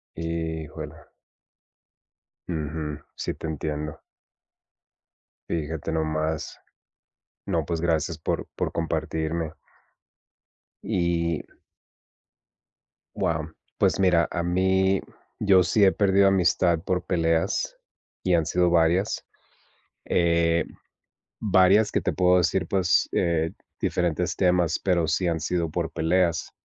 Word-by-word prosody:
Híjole. 80 -1 -4 1.5
Ujú, 75 -2 -4 0.2
sí, - - -3
te - - -6
entiendo. 75 -1 -4 1.5
Fíjate 80 -1 -3
nomás. 80 -1 -2 0.9
No, 80 -3 -1
pues, 85 0 -2
gracias 80 -1 0
por - - -2
por - - -2
compartirme. 80 0 -2 1.3
Y 85 -5 0 1.7
Wow, 80 -1 -1 0.3
pues, - - +2
mira, 90 -4 +4
a 85 - -1
mí 95 +2 +2 0.4
yo 95 -3 +5
sí 100 +5 +2
he 95 - +7
perdido 100 -1 +3
amistad 90 -3 +3
por 90 -1 -1
peleas, 80 -2 0 0.5
y 90 - +2
han 80 -2 +3
sido 90 +1 +2
varias, 85 +5 +2 0.8
eh, 85 -1 +2 0.7
varias, 100 +1 +4
que - - 0
te - - 0
puedo 90 0 +4
decir, 90 0 +1
pues, 95 -2 +2
eh, 80 -1 +1 0.3
diferentes 90 0 0
temas, 90 -3 +2
pero 85 -4 +2
sí 80 +3 0
han 85 -1 0
sido 85 +1 -1
por 80 0 -3
peleas. 85 +1 +1
85 Hz, 105 wpm, -25 LUFS, 80-90 Hz, 1.7 s, he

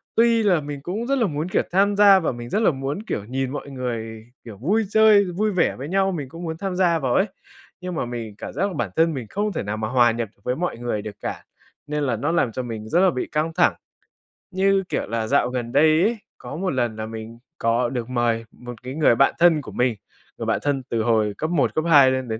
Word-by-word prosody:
Tuy 230 0 +4
là 180 -6 +3
mình 145 -1 -6
cũng 205 - -4
rất 275 0 +1
là 230 -5 +2
muốn, 155 +3 -3
kiểu, - - +1
tham 200 +2 +3
gia 200 -2 +7
và 165 - -1
mình 120 0 -8
rất 215 - 0
là 215 - +4
muốn, 140 +8 -4
kiểu, 105 - -3
nhìn 130 +3 -2
mọi 145 -1 -6
người, 115 -4 -5 0.2
kiểu, 110 -4 -9
vui 195 - +1
chơi, 215 -2 +6
vui 200 +4 -1
vẻ 185 - +1
với 135 +3 -7
nhau, 195 +1 +2
mình 145 -7 -5
cũng 165 +4 -9
muốn 160 -1 -4
tham 190 +1 -3
gia 175 -3 +2
vào 130 -3 0
ấy. 190 - +4 0.6
Nhưng 180 -1 -5
mà 120 - -1
mình 115 -3 -6
cảm - - -7
giác 195 - 0
là 190 - -5
bản 120 - -2
thân 165 0 +3
mình 125 -5 -5
không 205 0 -2
thể - - -3
nào 105 +2 -3
mà 110 0 -2
hòa 120 -1 +4
nhập 115 -1 -3
với 125 +1 -1
mọi 175 -7 -3
người 120 -3 -3
được 105 -1 -8
cả, - - -5 0.4
nên 150 0 -2
là 125 -4 0
nó 145 +8 -1
làm 140 -9 +1
cho 130 - -4
mình 110 -2 -6
rất 175 - +3
là 190 0 +5
bị 125 - -3
căng 155 +2 0
thẳng. 175 +1 +3 0.8
Như 195 +1 +2
kiểu - - -2
là, 110 +1 -2
dạo 130 -2 +2
gần 120 -2 -4
đây 155 +4 +4
ấy, 230 +3 +1 0.2
có - - -8
một 185 +2 -2
lần 120 -4 -1
là 110 0 -5
mình 110 +1 -8 0.2
có 115 +1 +1
được 120 -1 -4
mời, 120 -2 0
một 120 0 -9
cái 130 +3 -6
người 150 -6 +4
bạn 135 +4 +4
thân 170 -3 +5
của - - -10
mình, 125 -2 +1 0.4
người - - -4
bạn - - +1
thân 140 -2 0
từ 115 -1 0
hồi 110 -2 +2
cấp 155 - -2
1, 170 -5 +1
cấp 155 - +1
2 140 -5 +7
lên 130 -1 -2
đến 110 0 -3
140 Hz, 260 wpm, -23 LUFS, 120-180 Hz, 0.8 s, gia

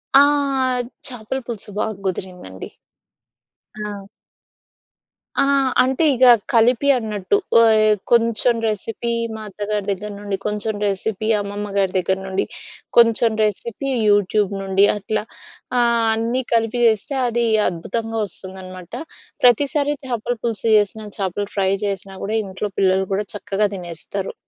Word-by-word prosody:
ఆ! - - +10 0.9
చాపల 245 +1 -4
పులుసు 215 -3 -6
బాగ 220 - 0 0.2
గుదిరిందండి! 180 - -6 1.1
ఆ! 205 -2 -6 1.3
ఆ! - - +4 0.4
అంటే 265 +5 0
ఇగ 255 0 +4 0.3
కలిపి 240 +4 +3
అన్నట్టు. 215 - -1 0.2
ఆహ్, 215 -1 +5 0.2
కొంచెం 230 0 +3
రెసిపీ 225 +2 -3 0.2
మా 220 - -7
అత్తగారి 205 +1 -3
దగ్గర 205 +2 -4
నుండి. 205 -1 -3
కొంచెం 210 +1 -1
రెసిపీ 205 +2 -2
అమ్మమ్మ 205 +1 -5
గారి 195 -2 +2
దగ్గర 190 +1 +1
నుండి. 190 0 -1 0.5
కొంచెం 230 -1 +5
రెసిపీ 230 +5 -2 0.2
యూట్యూబ్ 205 0 +2
నుండి. 195 +1 +3
అట్లా 210 +1 -2 0.5
ఆహ్, 235 -1 +3
అన్నీ 230 +3 -1
కలిపి 230 +1 +1
జేస్తే 225 +6 0
అది 235 0 0 0.2
అద్భుతంగా 225 +6 -4
వస్తుందనమాట. 185 -1 -6 0.5
ప్రతిసారి 285 +4 +3
చాపల 240 -1 -2
పులుసు 230 -1 0
చేసిన 210 +1 -1
చాపల 195 +1 -2
ఫ్రై 190 -1 +2
చేసినా 195 -1 -4
గూడా 215 +3 -2
ఇంట్లో 190 +2 -4
పిల్లలు 190 0 +2
గూడా 205 +2 -1
చక్కగా 205 +1 0
తినేస్తరు. 180 +2 -6
210 Hz, 120 wpm, -20 LUFS, 195-230 Hz, 1.3 s, ఆ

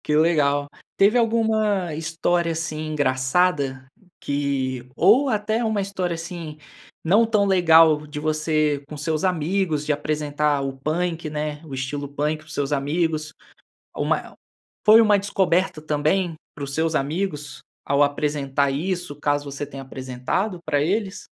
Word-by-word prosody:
Que 150 - +1
legal. 145 -3 +2 0.3
Teve 205 +5 +5
alguma 220 -6 +1
história, 165 +2 0
assim, 155 -1 -4
engraçada 140 0 +1 0.3
que 135 -3 -2
ou 245 +10 +5
até 215 +1 0
uma 220 -2 0
história, 185 -3 -2
assim, 165 -2 -7 0.5
não 200 +8 +4
tão 215 -3 +2
legal 165 -5 +5
de 150 0 -6
você 155 -1 0
com 150 - -7
seus 155 +1 -2
amigos 175 -3 0
de 150 - +2
apresentar 150 -1 -1
o 135 0 -3
punk, 165 +3 -2
né, 150 0 -4
o 145 - -10
estilo 135 +2 -3
punk 150 +2 -1
para 155 - -18
os 155 - -8
seus 145 -1 -2
amigos? 155 +2 -1 0.6
Ou - - -2
má - - +2
el - - -14 0.5
foi 215 +2 +9
uma 210 -2 +5
descoberta 190 -4 0
também 155 +4 0 0.2
para 145 - -5
os 140 0 -6
seus 160 +1 0
amigos 150 -3 -2 0.2
ao 140 +1 +2
apresentar 145 -1 0
isso, 175 +3 -3
caso 145 0 0
você 140 +1 -5
tenha 135 -1 -9
apresentado 130 - -3
pra 145 -2 +1
eles? 195 +4 -2
155 Hz, 150 wpm, -23 LUFS, 145-180 Hz, 0.6 s, foi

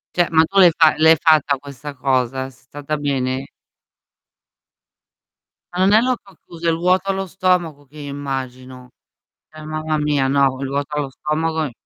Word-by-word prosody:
Cioè, 175 -1 +2
ma 160 - +7
tu 195 - -16
l'hai 180 -3 +7
fa 160 - +6
l'hai 160 +1 +6
fatta 150 -4 +3
questa 140 +1 -9
cosa? 130 0 -1
Sei - - -17
stata 145 +3 -5
bene? 135 -2 -2 2.3
Ma 180 - -4
non 200 - +4
è 215 - +6
l'occhio 240 -6 -3
chiuso, 170 0 -6
è - - +4
il - - 0
vuoto 180 +3 +1
allo 195 0 -3
stomaco 175 -5 -1
che 145 +3 -18
io 145 -1 -7
immagino. 130 -2 -6 0.6
Cioè, 155 0 -12
mamma 155 0 -2
mia, 150 -2 0
no, 135 -1 +2
quel 135 +1 -5
vuoto 140 +2 -3
allo 145 -2 -2
stomaco 160 +3 -2
i 140 - -6
150 Hz, 170 wpm, -19 LUFS, 135-165 Hz, 2.3 s, ma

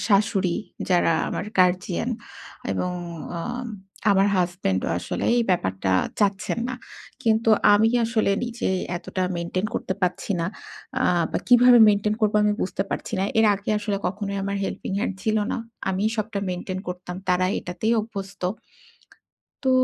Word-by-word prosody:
শাশুড়ি 200 -4 +2 0.3
যারা 175 -2 +4 0.2
আমার - - -3
guardian 185 +4 +2 0.6
এবং 180 - -1 0.4
অ্যা 170 -1 -4 0.7
আমার 195 0 +4
হাসব্যান্ডও 175 - 0
আসলে - - -4
এই 240 - +4
ব্যাপারটা 95 - 0 0.3
চাচ্ছেন 200 +1 +1
না, 255 - -2 0.5
কিন্তু 225 0 +3 0.2
আমি 215 +2 +4
কি - - +3
আসলে 225 -3 +1
নিজে 240 0 -3 0.3
এতটা 185 +2 -4
maintain 180 +3 -2
করতে 190 - -2
পারছি 180 +3 0
না। 165 - 0 0.5
অ্যা 260 - +1 0.3
বা - - +1
কিভাবে 245 0 +8
maintain 210 +1 +2
করবো 210 0 +3
আমি 210 - +3
বুঝতে 190 - -1
পারছি - - -4
না। 195 - +2
এর 220 - +6
আগে 200 +2 -4
আসলে 205 -1 -2
কখনোই 200 +1 -3
আমার 200 0 -2
helping 190 - -4
hand 205 - -1
ছিল 220 -1 +1 0.2
না। - - -1 0.3
আমি 190 +2 -1
সবটা 215 -1 -2
maintain 185 +1 -4
করতাম। 180 0 -6
তারা 180 0 +3
এইটাতেই 185 +6 -1
অভ্যস্ত। 200 -3 -7 1.2
তো, 265 - +2
200 Hz, 150 wpm, -24 LUFS, 180-215 Hz, 1.2 s, কিভাবে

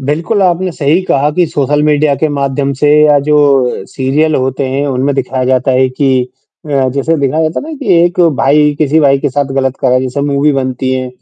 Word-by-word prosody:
बिल्कुल, 160 +10 -2
आपने 180 0 0
सही 155 +3 0
कहा 145 +2 +1
कि 175 +4 +1
सोशल 145 0 -1
मीडिया 150 -1 +2
के 155 - +1
माध्यम 140 -1 -2
से 145 +3 0 0.2
या 150 -1 +4
जो 150 - +2 0.5
सीरियल 150 +4 -1
होते 130 +1 -1
हैं, 140 +2 -2
उनमें 135 +1 -1
दिखाया 130 -1 -2
जाता 130 +1 +1
है 130 +1 +2
कि 130 -1 0 0.4
अ, 135 -3 0
जैसे 140 +5 -1
दिखाया 150 +4 0
जाता 155 +1 -2
है 315 - -8
ना 305 - -7
कि 195 - 0
एक 175 +1 -1
भाई 145 +3 +2
किसी 155 +1 +2
भाई 140 -2 +3
के 145 +1 -1
साथ 145 +2 -1
ग़लत 135 -1 -1
करा 125 0 +2
जैसे 130 +2 -3
मूवी 145 +1 +1
बनती 130 -1 -2
हैं 130 0 -3
140 Hz, 210 wpm, -11 LUFS, 130-150 Hz, 0.5 s, या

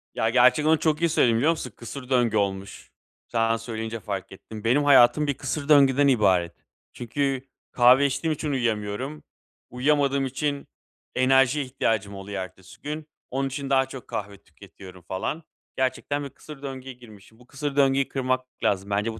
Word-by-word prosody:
Ya, 110 - +1
gerçekten 130 +6 +4
onu 160 -1 +4
çok 155 0 0
iyi 170 - +3
söyledin, 120 -7 +3
biliyor 145 +8 +3
musun? 145 -7 -5
Kısır 125 +2 -9
döngü 120 -4 +2
olmuş. 100 -1 -3 0.4
Sen 115 -1 +1
söyleyince 115 0 -5
fark 95 -3 -5
ettim. 105 +2 -10
Benim 125 +6 +3
hayatım 145 +1 +5
bir 145 - +1
kısır 140 +2 -4
döngüden 140 -1 +5
ibaret. 95 -9 +3 0.4
Çünkü 135 +2 -2 0.3
kahve 125 +3 +5
içtiğim 150 +4 -1
için 150 0 -3
uyuyamıyorum. 120 +3 -2 0.5
Uyuyamadığım 140 +1 +1
için 140 +2 -3 0.5
enerjiye 135 +2 +3
ihtiyacım 110 -6 -1
oluyor 95 0 -5
ertesi 95 0 -14
gün. 150 +1 -5 0.2
Onun 135 +1 -1
için 135 +1 -5
daha 135 -1 +3
çok 130 -1 -10
kahve 100 -1 -5
tüketiyorum 90 +3 -14
falan. 150 - -3 0.3
Gerçekten 145 +2 -1
bir 140 - -6
kısır 150 +1 -13
döngüye 135 -1 -7
girmişim. 110 -3 -17
Bu 125 - -19
kısır 140 0 -4
döngüyü 135 -1 +3
kırmak 130 -1 -1 0.2
lazım. 100 0 0
Bence 105 +3 -1
bu 110 - -10
130 Hz, 165 wpm, -25 LUFS, 110-140 Hz, 0.5 s, hayatım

